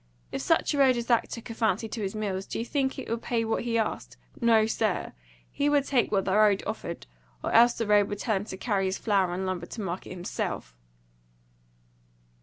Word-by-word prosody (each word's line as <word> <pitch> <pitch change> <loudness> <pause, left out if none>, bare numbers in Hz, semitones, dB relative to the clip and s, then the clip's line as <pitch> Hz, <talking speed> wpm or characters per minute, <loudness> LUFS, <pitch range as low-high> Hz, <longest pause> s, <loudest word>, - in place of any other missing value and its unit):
If - - -3
such 330 -1 +2
a 285 - -1
road 260 -3 +5
as 235 - -2
that 235 -2 +2
took 230 0 -7
a - - -4
fancy 225 -1 0
to 220 - -5
his 195 0 -3
mills, 195 -3 -3
do - - -4
you 230 - -2
think 270 0 -1
it 265 - -6
would 230 0 -2
pay 230 -2 -1
what 225 +1 -1
he 230 -1 +1
asked? 220 - -2 0.2
No, 225 -2 +5
sir! 220 -3 -1 0.4
He 285 +1 +1
would 290 -2 +3
take 260 -4 +1
what 195 -2 +1
the 190 - 0
road 210 -2 +4
offered, 205 -5 -5 0.4
or - - -1
else 235 +1 +6
the 230 - -2
road 205 -1 +4
would 205 - -3
tell 215 0 0
him 195 - -4
to 190 - -7
carry 195 -2 0
his 190 - -2
flour 195 -5 +1
and 185 +2 -2
lumber 180 -2 -3
to 225 - -7
market 185 -1 -4
himself." 175 - -4
220 Hz, 220 wpm, -27 LUFS, 195-235 Hz, 0.4 s, else